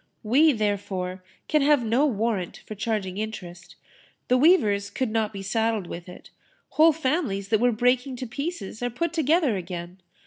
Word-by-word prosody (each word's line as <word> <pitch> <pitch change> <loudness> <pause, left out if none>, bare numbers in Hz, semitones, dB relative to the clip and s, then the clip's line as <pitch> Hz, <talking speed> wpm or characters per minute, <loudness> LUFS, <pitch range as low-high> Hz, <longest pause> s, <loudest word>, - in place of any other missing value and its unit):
We, 280 +9 +5
therefore, 195 -5 -2 0.2
can 305 -1 +2
have 285 -3 +3
no 245 +7 +3
warrant 220 - -2
for - - -7
charging 210 -3 -3
interest. 180 -5 -7 0.5
The 250 - +4
weavers 215 - +4
could 255 -4 -2
not 220 -1 0
be 195 -2 -7
saddled 220 0 0
with 170 +1 -8
it. 180 - -13 0.4
Whole 320 +1 +5
families 260 - -1
that 220 - +3
were 245 +2 +3
breaking 250 +3 +1
to 255 - -5
pieces 250 - -5
are 245 - 0
put 335 +7 -2
together 315 - +2
again. 180 0 -7
225 Hz, 165 wpm, -25 LUFS, 195-270 Hz, 0.5 s, We